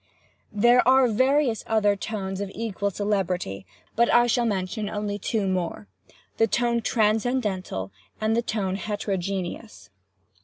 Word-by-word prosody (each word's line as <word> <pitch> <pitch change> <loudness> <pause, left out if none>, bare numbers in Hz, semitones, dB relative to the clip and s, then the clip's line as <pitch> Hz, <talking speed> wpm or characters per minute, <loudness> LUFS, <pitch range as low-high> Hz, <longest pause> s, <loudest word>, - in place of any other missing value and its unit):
"There 240 +3 +5
are 260 0 +6
various 255 +1 +2
other 210 -2 +2
tones 195 -2 -4
of 200 - -3
equal 205 -2 -2
celebrity, 185 - -2 0.3
but 235 +1 +3
I 240 0 +5
shall 240 0 +1
mention 205 +1 -2
only 205 -1 -3
two 205 0 -1
more—the 105 - -3
tone 235 +1 +1
transcendental 215 - 0 0.3
and 220 +1 +1
the 235 - +2
tone 195 -5 -2
heterogeneous. 195 - -4
210 Hz, 120 wpm, -25 LUFS, 190-230 Hz, 0.3 s, are